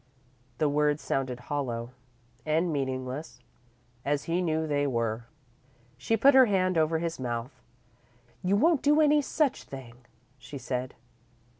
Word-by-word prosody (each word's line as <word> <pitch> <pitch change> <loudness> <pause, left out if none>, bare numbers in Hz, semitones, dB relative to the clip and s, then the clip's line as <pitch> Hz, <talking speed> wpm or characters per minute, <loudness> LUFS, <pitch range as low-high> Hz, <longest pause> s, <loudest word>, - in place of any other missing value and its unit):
The 155 - +2
words 150 0 +2
sounded 130 -2 -2
hollow 120 -3 -3 0.5
and 160 +2 +1
meaningless, 130 +1 -4 0.6
as 145 0 0
he 170 +2 0
knew 160 -2 0
they 145 -2 0
were. 115 -2 -2 0.7
She 225 - 0
put 275 +6 +6
her 260 -1 +7
hand 185 -3 +1
over 160 0 +2
his 165 -1 -3
mouth. 125 +1 -4 0.8
"You 185 +2 +2
won't 315 +7 +3
do 295 +1 +4
any 300 -1 +5
such 285 -1 0
thing," 130 -4 -10 0.5
she 125 +4 -9
said. 125 0 -4
145 Hz, 135 wpm, -28 LUFS, 130-180 Hz, 0.8 s, her